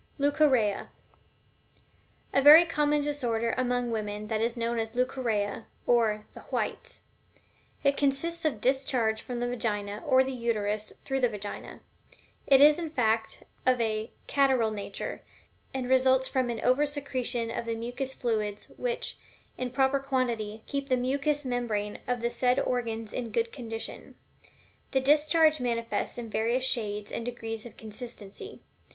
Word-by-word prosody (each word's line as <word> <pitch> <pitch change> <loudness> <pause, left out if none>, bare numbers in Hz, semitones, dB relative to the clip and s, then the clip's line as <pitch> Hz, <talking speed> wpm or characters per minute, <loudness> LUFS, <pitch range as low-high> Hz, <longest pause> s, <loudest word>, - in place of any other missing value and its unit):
LEUCORRHEA. 280 -8 +2 1.5
A 275 - +4
very 305 +5 +10
common 295 -2 +1
disorder 240 -6 -1
among 245 -1 0
women 210 -1 -3
is 220 +2 0
that - - -7
known 235 0 0
as 225 +1 -4
Leucorrhea, 235 -5 -1 0.2
or 220 -3 +2
"the - - -10
whites." - - -3 0.8
It 280 0 +3
consists 310 +5 0
of 310 -3 +2
a - - -13
discharge 245 -2 +1
from 245 -1 -5
the 245 - -1
Vagina, 210 -4 -2
or 260 0 +5
the 265 - -3
Uterus 215 -4 -1
through 270 0 0
the 250 -2 +3
Vagina. 205 -2 -7 0.7
It 270 -1 +7
is, 300 +2 +7
in 330 -2 -3
fact, 225 -6 0 0.2
of 255 -1 +3
a 220 0 -1 0.2
catarrhal 265 -6 +3
nature, 200 -1 -5 0.5
and 260 -2 -3
results 260 0 +4
from 255 -2 0
an 230 -2 -3
over 260 +4 +3
secretion 255 -5 -2
of 230 - -3
the 230 0 -2
mucus 245 +4 -4
fluids 215 -4 -2
which, - - -2 0.4
in 255 -1 -3
proper 270 +2 +2
quantity, 235 -6 -2
keep 280 -1 -3
the 255 - +3
mucus 280 +3 0
membrane 225 -5 -2
of 245 -2 -1
the 235 0 0
said 250 +2 +2
organs 230 -4 -2
in 240 -2 -3
good 230 +1 0
condition. 225 -4 -6 0.8
The 265 - +4
discharge 305 +3 +4
manifests 235 -2 -2
in 240 -1 -5
various 230 +4 0
shades 210 -5 -1
and - - -3
degrees 225 -1 -5
of - - -16
consistency. 225 - -9
245 Hz, 150 wpm, -29 LUFS, 225-270 Hz, 1.5 s, very